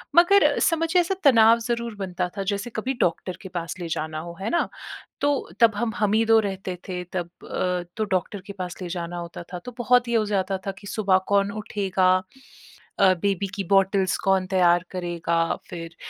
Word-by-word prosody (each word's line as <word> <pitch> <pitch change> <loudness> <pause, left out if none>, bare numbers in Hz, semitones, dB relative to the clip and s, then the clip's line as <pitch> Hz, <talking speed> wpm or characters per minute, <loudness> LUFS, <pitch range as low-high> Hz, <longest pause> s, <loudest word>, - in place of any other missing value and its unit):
मगर 375 +4 +6
समझिए 330 +1 +2
ऐसा 380 +3 -1
तनाव 230 -4 +6
ज़रूर 235 -2 -2
बनता 180 -2 -2
था। 195 - -1
जैसे 200 +4 -3
कभी 255 +5 -1
डॉक्टर 175 +2 0
के 190 - -9
पास 170 -1 -4
ले 170 - -4
जाना 155 -1 -3
हो, 170 +1 -8
है 200 - -2
ना? 340 - +1 0.5
तो 285 -1 0
तब 225 -3 +5
हम, 225 0 -1
हम 210 -1 +1
ही 225 +1 +4
2 225 0 +6
रहते 195 -3 -3
थे 180 -1 -4
तब 175 -2 -2
अ, 180 -1 -2
तो 215 - +1
डॉक्टर 190 +2 -1
के 200 - -8
पास 180 -2 -5
ले 180 - -4
जाना 175 0 -4
होता 170 0 -7
था 180 - -4
तो 250 - -6
बहुत 245 0 +3
ये 235 - +1
हो 215 - +1
जाता 195 -2 0
था - - 0
कि 200 - -11
सुबह 195 -3 +2
कौन 200 0 +2
उठेगा? 210 -1 -4 1.1
अ, 185 -1 +6
बेबी 200 -1 0
की 200 - -2
बॉटल्स 195 -1 +3
कौन 190 -1 +2
तैयार 175 -2 +3
करेगा? 170 -2 -1
फिर 165 -1 -7
195 Hz, 200 wpm, -24 LUFS, 180-220 Hz, 1.1 s, मगर